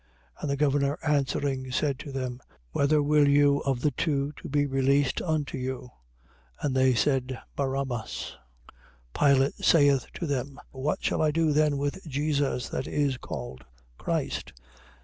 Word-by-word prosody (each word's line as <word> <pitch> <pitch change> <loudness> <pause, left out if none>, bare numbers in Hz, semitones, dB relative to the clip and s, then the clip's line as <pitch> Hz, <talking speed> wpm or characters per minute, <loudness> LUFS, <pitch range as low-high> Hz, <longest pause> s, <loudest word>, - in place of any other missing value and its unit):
27:21. - - -16
And 150 - -2
the 140 - 0
governor 140 0 +1
answering, 135 -2 0
said 140 0 0
to 145 - -7
them: 130 -2 -4 0.3
Whether 145 - +2
will 150 0 +4
you 140 0 +4
of 135 -3 0
the 150 - +2
two 140 0 -1
to - - -8
be 145 0 +2
released 135 0 +2
unto 155 -5 -2
you? 130 -1 -5 0.7
But 140 - -1
they 130 -1 +3
said: 130 0 +1 0.2
Barabbas. 135 -4 -3 0.8
27:22. 140 -1 +4
Pilate 135 +1 +1
saith 145 -5 +4
to 175 - -3
them: 140 -1 -3
What 135 +3 -2
shall - - 0
I 155 - +3
do 155 0 +2
then 150 -1 +3
with 145 +6 -3
Jesus 145 -2 0
that 130 - -3
is 140 -3 0
called 65 - -7 0.4
Christ? - - -2
140 Hz, 155 wpm, -27 LUFS, 130-145 Hz, 0.8 s, will